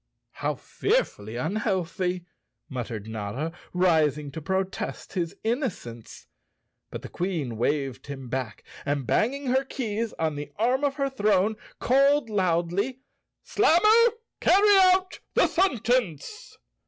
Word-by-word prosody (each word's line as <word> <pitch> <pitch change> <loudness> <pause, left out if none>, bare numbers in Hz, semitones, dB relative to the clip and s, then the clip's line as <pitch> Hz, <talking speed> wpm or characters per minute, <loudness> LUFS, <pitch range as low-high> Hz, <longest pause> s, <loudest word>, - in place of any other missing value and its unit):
"How - - -2
fearfully 120 - -1
unhealthy," 180 - -1 0.4
muttered 120 -6 -5
Notta, 110 +8 -4 0.2
rising 155 -5 +2
to 160 - -7
protest 190 +4 -3
his 170 -4 -2
innocence. 220 - -4 0.6
But - - -7
the - - -6
Queen 165 -10 -3
waved 135 +3 -1
him 135 -2 -7
back, 125 -3 -4 0.2
and 140 -2 -1
banging 265 - +1
her 265 +1 +3
keys 230 -4 -3
on 155 -2 -2
the 145 - -6
arm 250 +6 +1
of 280 -1 +1
her 275 -2 -1
throne 210 -3 +2 0.2
called 275 -1 +3
loudly, 190 +6 0 0.4
"Slammer, 425 +5 +5 0.3
carry 410 +2 +5 0.2
out 370 0 0 0.2
the - - +5
sentence!" 255 - 0
190 Hz, 115 wpm, -26 LUFS, -, 0.6 s, Slammer